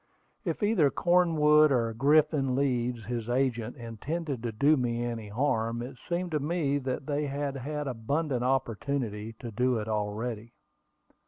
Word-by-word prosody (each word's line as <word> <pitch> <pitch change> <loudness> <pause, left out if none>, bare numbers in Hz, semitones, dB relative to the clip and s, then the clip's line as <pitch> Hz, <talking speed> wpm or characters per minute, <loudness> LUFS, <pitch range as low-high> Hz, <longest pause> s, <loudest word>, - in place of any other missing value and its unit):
If 170 0 -2
either 205 -9 +4
Cornwood 155 -3 +4
or 115 -3 +1
Griffin 145 +1 +3
Leeds, 125 -4 0
his 120 0 -4
agent, 120 -2 0
intended 135 +4 -4
to 120 -1 -2
do 140 +8 +4
me 120 -3 -1
any 115 -3 -4
harm, 115 0 0
it 130 +2 -8
seemed 175 0 -1
to 155 - +1
me 145 -2 0
they 145 +2 -2
had 140 0 -3
had 150 +2 -4
abundant 130 +2 -1
opportunity 120 -3 -1
to 115 +1 -8
do 125 +3 +1
it 105 -1 -4
already. 110 +2 -3
130 Hz, 145 wpm, -29 LUFS, 115-150 Hz, -, either